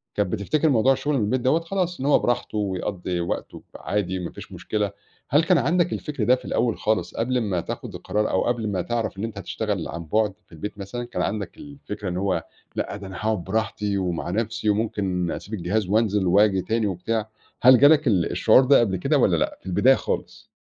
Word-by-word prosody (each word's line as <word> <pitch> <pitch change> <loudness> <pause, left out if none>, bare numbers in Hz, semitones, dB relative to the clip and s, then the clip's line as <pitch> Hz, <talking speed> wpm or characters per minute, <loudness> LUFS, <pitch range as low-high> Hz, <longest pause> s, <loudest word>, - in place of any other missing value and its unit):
كانت 100 -4 0
بتفتكِر 150 +10 +1
موضوع 130 +1 +4
الشغل 140 +2 -1
من 110 - +1
البيت 125 +4 0
دوّة، 140 +6 +3
خلاص 180 0 -2
إن 135 - -3
هو 145 - +5
براحته 120 -3 -1
ويقضِّي 95 -2 -2
وقته 85 - -4 0.2
ب - - -9
عادي 95 -3 -2
ما 90 - -5
فيش - - -11
مشكلة. 105 -2 -2 0.4
هل 150 +4 +5
كان 180 +1 +4
عندك 175 +4 +2
الفِكر 145 -6 -3
ده 125 +4 +5
في - - -12
الأول 120 -3 0
خالص، 110 0 -1
قبل 125 +2 0
ما 95 -6 -1
تاخُد - - -6
القرار، 105 0 -1
أو 95 - +1
قبل 115 -3 -1
ما 95 -3 -1
تعرَف 115 -3 -2
إن 100 - -4
أنتَ 115 -2 -5
هتشتغَل 100 -1 -3
عن 85 0 -6
بُعد 105 +4 +1
في - - -37
البيت؟ 100 +6 -7
مثلًا 105 +5 -5
كان 105 -6 -4
عندك 100 +1 -3
الفكرة 120 -9 -7
إن 90 - -3
هو 95 -4 0 0.3
لأ - - -3
ده 100 - -9
أنا 95 - -9
هاقعُد 110 -4 -1
براحتي 105 0 -1
ومع 90 -2 -2
نفسي، 110 +1 -1
وممكن 95 -5 0
أسيبك 110 +2 -5
الجهاز 95 +3 -1
وانزَل 105 -2 +2
وآجي 95 +1 +4
تاني 110 +2 0
وبتاع؟ 110 +4 -2 0.3
هل 125 0 +8
جالك 145 +1 +6
ال 95 -7 +2
الشعور 130 - +5
ده 140 +1 +6
قبل 100 -5 +1
كده - - +1
والّا - - +3
لأ - - -1
في - - -30
البداية 105 +8 +4
خالص؟ - - -4
105 Hz, 215 wpm, -24 LUFS, 95-125 Hz, 0.4 s, هل